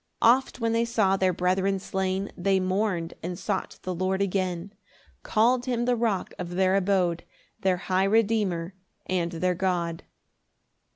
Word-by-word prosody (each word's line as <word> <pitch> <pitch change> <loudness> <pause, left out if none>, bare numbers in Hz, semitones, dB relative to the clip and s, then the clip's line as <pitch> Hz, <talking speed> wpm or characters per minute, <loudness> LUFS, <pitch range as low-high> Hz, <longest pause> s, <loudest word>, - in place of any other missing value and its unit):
4 230 - +6
Oft 255 +1 +2
when 230 -1 0
they 230 0 +2
saw 220 -5 +2
their 190 -1 +2
brethren 185 +2 +1
slain, 190 +1 -2
They 190 +1 +2
mourn'd 185 -2 -1
and 175 +1 -4
sought - - -3
the 185 - -2
Lord 185 +2 -1
again; 185 -1 -1 0.5
Call'd 240 +3 +2
him 240 -1 0
the 250 0 +2
Rock 225 -5 -1
of 175 -1 -5
their 190 0 +3
abode, 185 -3 +1 0.4
Their 185 -1 +1
high 185 +1 +1
Redeemer 200 -5 +1 0.3
and 175 -2 -1
their 180 +2 0
God. 175 -3 -1
190 Hz, 155 wpm, -26 LUFS, 180-210 Hz, 0.5 s, 4